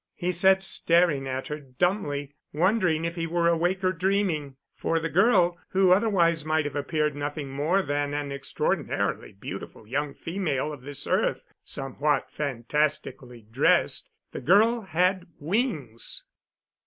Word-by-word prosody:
He 180 -1 -1
sat 190 +2 +4
staring 170 -7 +3
at 130 0 -4
her 150 0 -4
dumbly, 145 0 -2 0.2
wondering 175 -1 +2
if 170 - -2
he 165 -1 -3
were 170 0 +1
awake 175 +3 +1
or 185 - +3
dreaming. 180 -6 0 0.2
For 165 - -1
the 165 0 -2
girl 180 -3 +3
who 190 -1 +3
otherwise 180 -6 +3
might 155 0 +1
have 145 -1 -4
appeared 150 0 -1
nothing 145 -1 -4
more 160 +8 +1
than 145 -1 -1
an 145 -1 -3
extraordinarily 140 0 -2
beautiful 100 +2 -8
young 140 +5 -2
female 155 -5 -2
of 145 - -10
this 140 +1 -5
earth, - - 0 0.2
somewhat 140 +1 -1
fantastically 135 -2 -2
dressed 110 +2 +2 0.2
the - - -6
girl 220 - +4
had 180 0 0
wings! 155 - -1
155 Hz, 140 wpm, -26 LUFS, 145-180 Hz, 0.2 s, sat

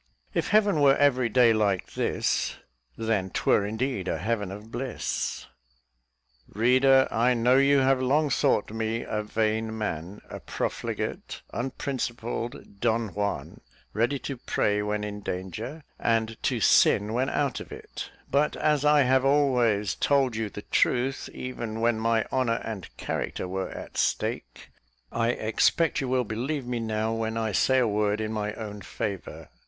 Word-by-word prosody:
"If - - 0
Heaven 205 -5 +3
were 140 -1 +6
every 130 -4 +3
day 120 0 +5
like 100 -4 0
this, - - 0 0.4
Then 110 -4 0
'twere 100 +2 +2
indeed 110 -3 -2
a - - 0
Heaven 105 -1 -2
of 105 +3 -9
bliss." 125 +2 -3 1.0
Reader, 130 +4 +4
I 120 +2 +3
know 120 +2 +4
you 140 +1 +5
have 130 0 +3
long 145 +3 +2
thought 105 - +2
me 110 +1 -2
a 105 - -2
vain 110 +1 -1
man 95 -2 -4
a - - -7
profligate, - - -4
unprincipled 120 -4 -4
Don 115 -1 +1
Juan, 100 -9 -3 0.3
ready 120 +6 +1
to 135 0 -5
pray 105 -3 0
when 105 0 -2
in 105 0 -5
danger, 105 - -5 0.2
and 115 -1 +1
to 125 -3 0
sin 105 0 +4
when 130 +3 +1
out 140 -3 0
of - - -10
it: - - -8 0.2
but 145 +2 +1
as 150 -2 +1
I 150 -1 +5
have 130 +1 +3
always 125 -8 +2
told 135 -4 +2
you 110 -1 -2
the 105 - -8
truth, 130 +2 +1
even 115 -3 -5
when 115 -1 +2
my 115 0 +1
honour 125 -3 +1
and 105 -6 -6
character - - -3
were 95 0 -3
at - - -9
stake, - - -2 0.4
I 115 0 0
expect 125 +9 +2
you 135 - -2
will 130 0 +1
believe 125 +6 -3
me 120 -1 -2
now, 110 0 -1
when 115 0 -2
I 110 -1 -1
say 130 +7 +3
a 125 -2 +3
word 105 0 +1
in 110 0 -2
my 105 -1 -2
own 105 -2 -7
favour. 100 -2 -5
115 Hz, 155 wpm, -27 LUFS, 105-130 Hz, 1.0 s, were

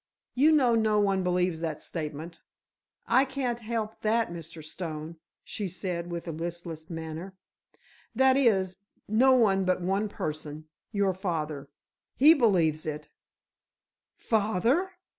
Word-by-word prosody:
"You 290 +5 +5
know 265 -6 +4
no 220 -2 +3
one 195 -2 +2
believes 180 -2 0
that 160 -3 -3
statement?" 160 +1 -6 0.6
"I 255 +3 +4
can't 265 -3 -2
help 220 -1 -4
that, 225 -1 +1
Mr. 165 -1 -8
Stone," 155 0 -6 0.3
she 205 - -4
said, 175 -1 -4
with 170 0 -5
a - - -2
listless 165 0 -6
manner. 165 +3 -6 0.8
"That 265 +2 +5
is, 195 -9 +2 0.3
no 250 +5 +5
one 200 -6 +4
but 185 0 +1
one 195 +3 0
person—your 155 +5 -4
father. 155 -7 -3 0.5
He 300 +5 +8
believes 175 - +2
it." 150 0 -5 1.1
"Father!" 225 - +1
185 Hz, 125 wpm, -28 LUFS, 165-225 Hz, 1.1 s, He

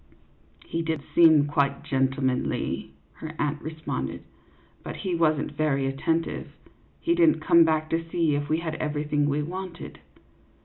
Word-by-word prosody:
"He 165 - -2
did 160 -3 -2
seem 160 -4 +6
quite 140 -1 0
gentlemanly," 130 -1 -1 0.2
her 155 0 -7
aunt 150 0 -1
re 155 +1 -6
sponded, 65 - -4 0.3
" - - -32
but - - -6
he 185 - -3
was 160 -2 +3
n't 150 - -4
very 145 -2 0
attentive; 160 +5 -1 0.5
he 340 - +1
did 340 -1 +5
n't - - 0
come 170 -2 +6
back 155 -1 +1
to 165 0 0
see 165 -3 +1
if 145 0 -2
we 155 - +2
had 160 -2 -3
everything 150 -1 0
we 145 +1 0
wanted." 180 +1 -7
155 Hz, 165 wpm, -26 LUFS, 145-165 Hz, 0.5 s, seem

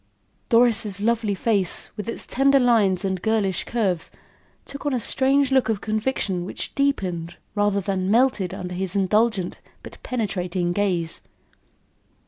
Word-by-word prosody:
Doris' 230 -4 +3
lovely 220 -1 0
face, 195 -3 +1
with 210 +2 -5
its - - -6
tender 275 +2 +3
lines 215 -7 +3
and 190 -2 -2
girlish 210 -4 0
curves, 195 -8 -1 0.6
took 280 - -8
on 290 -3 0
a - - 0
strange 270 +4 +1
look 265 -3 +3
of 220 -3 0
conviction 215 -4 -1
which 180 - -6
deepened, 180 - -1 0.2
rather 205 -1 +1
than 190 -1 -2
melted 225 -5 +2
under 180 0 -6
his 185 +1 -3
indulgent, 200 -1 +1 0.2
but - - -12
penetrating 180 -7 -2
gaze. 175 -4 0
205 Hz, 135 wpm, -23 LUFS, 185-235 Hz, 0.6 s, Doris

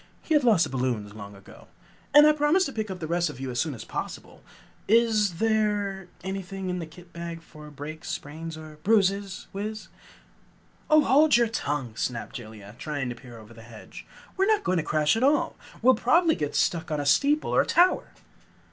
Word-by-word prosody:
He 320 - -1
had 295 -2 +4
lost 215 -8 +4
the - - -2
balloons 125 -6 -2
long 100 -1 -10
ago. 100 0 -16 0.4
"And 295 0 +8
I 305 - +7
promise 305 +5 +2
to 275 - -5
pick 220 -1 -3
up 185 -1 -6
the 165 - -4
rest 170 +1 0
of 145 - -9
you 135 -1 -4
as 120 - -3
soon 155 -4 -1
as 115 - -9
possible. - - -7 0.5
Is 220 -3 +3
there 205 -2 0 0.2
anything 190 0 -4
in 180 - -3
that 165 -2 -7
kit 175 +1 -16
bag 170 -1 -7
for 150 -2 -13
breaks, 150 +2 -8
sprains 160 +2 -6
and 155 -1 -12
bruises, 200 -1 +1
Wiz?" 215 +2 -5 1.0
"Oh, 305 0 +6
hold 295 +1 +5
your 235 -2 +2
tongue!" 140 - -3
snapped 120 0 -4
Jellia, 110 -4 -11
trying 145 -4 -3
to 120 - -5
peer 120 -1 -13
over 110 +1 -14
the 115 - -13
hedge. 115 -1 -12 0.3
"We're 385 +1 +2
not 430 -1 +2
going 185 - +1
to 165 - 0
crash 155 +4 +2
at 225 - -1
all! 290 +2 +2 0.3
We'll 260 +2 +7
probably 320 +9 +3
get 150 -3 -3
stuck 165 -2 0
on 150 -1 -1
a 145 - -3
steeple 285 - +2
or - - +4
tower!" 360 +2 +3
175 Hz, 200 wpm, -26 LUFS, 145-225 Hz, 1.0 s, And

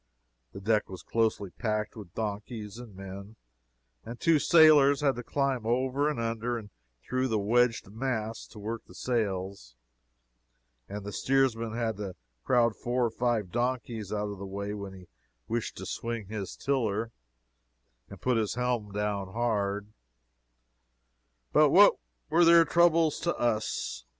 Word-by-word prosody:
The 95 - -7
deck 105 +2 +1
was 95 -1 -8
closely 110 -4 0
packed 105 -1 -2
with 100 -6 -11
donkeys 105 0 -5
and 115 -5 -11
men; 95 +2 -9 0.7
the 115 - -7
two 160 +4 +3
sailors 150 -4 +6
had 140 -2 +3
to 120 - -5
climb 135 -1 -1
over 130 +5 +1
and 150 - -3
under 115 +1 -2
and 105 -3 -9 0.3
through 130 +2 -1
the 110 -3 0
wedged 115 +3 +2
mass 115 -1 -3
to - - -15
work 110 +2 -5
the 90 - -15
sails, 95 - -2 1.1
and 100 +1 -6
the 105 - -5
steersman 115 -3 +1
had 115 -3 -1
to 100 -3 -5 0.3
crowd 120 -3 +3
four 125 +3 0
or 115 - -1
five 115 -5 -1
donkeys 120 -4 -2
out 105 -1 -2
of 100 - -8
the 100 - -6
way 100 +1 -4
when 100 -2 -6
he 90 -2 -13 0.4
wished - - -3
to - - -6
swing 115 -2 -4
his 100 -4 -5
tiller 115 -5 -1 1.0
and - - -11
put 125 -2 +2
his 110 -1 -1
helm 120 -4 -1
hard 105 0 -1
down. 105 - -27 1.6
But - - +6
what - - +7 0.3
were 170 +2 +4
their 170 0 +7
troubles 165 -1 +3
to 170 +1 -1
us? 110 - -1
115 Hz, 150 wpm, -29 LUFS, 105-125 Hz, 1.6 s, what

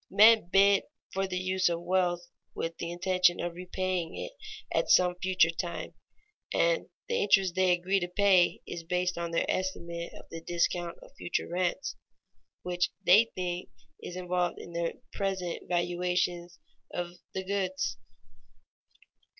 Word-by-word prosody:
Men 215 -1 +6
bid 200 +1 +5 0.3
for 195 0 0
the 185 -1 -3
use 185 0 +1
of 170 0 -2
wealth 175 -1 +1 0.3
with 165 0 -3
the 170 - -3
intention 180 0 +2
of 175 0 -2
repaying 180 -1 -3
it - - -5 0.4
at - - +1
some 180 -1 +5
future 185 -3 +3
time, 170 +1 -4 0.6
and - - +2 0.2
the 475 0 0
interest 195 - +4
they 185 0 +3
agree 180 +2 +2
to 175 - -2
pay 185 -1 +4
is 170 - -5
based 180 +2 0
on 170 0 -3
their 165 - +1
estimate 170 -2 -3
of - - -11
the 165 - -6
discount 175 0 -1
of - - -15
future 175 - -2
rents, 180 +9 -1 0.7
which 180 0 0 0.2
they 210 +6 +7
think 180 -1 -3 0.3
is 175 - -7
involved 180 -1 -1
in 170 - -9
the 170 0 -2
present 190 -3 -3
valuations 175 0 0 0.3
of 175 0 -4 0.2
the 190 - -2
goods. 185 -10 -2
180 Hz, 145 wpm, -30 LUFS, 175-190 Hz, 0.7 s, they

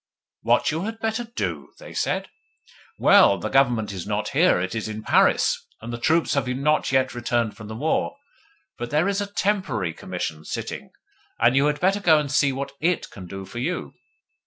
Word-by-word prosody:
'What - - +2
you 160 +5 -2
had 225 +1 -4
better 225 +1 -2
do?' 235 +1 -4
they - - -11
said. - - -1 0.7
'Well - - +6
the - - -4
Government 120 -6 +2
is 95 -3 -6
not - - -1
here - - +3
it 95 +1 -2
is 110 -1 -3
in 110 0 -6
Paris, - - +3 0.2
and 120 +2 -7
the 120 - -4
troops 160 +7 +2
have 140 -2 0
not 140 +5 +1
yet 130 0 +2
returned 120 -2 -1
from 105 -2 -10
the 110 - -7
war; 155 - 0 0.6
but 120 0 -4
there 150 +6 +2
is 200 0 0
a 200 0 -5
TEMPORARY 170 - -1
Commission 85 -4 -5
sitting, - - -5 0.5
and 120 +2 +4
you 140 +2 +4
had 150 0 0
better 195 +3 +2
go 165 -6 +5
and 145 -2 -1
see 145 -1 +3
what 135 +1 -4
IT 175 +2 0
can 95 -2 -10
do 95 +2 -7
for 120 - -7
you. 125 - -3
135 Hz, 195 wpm, -24 LUFS, 110-170 Hz, 0.7 s, Well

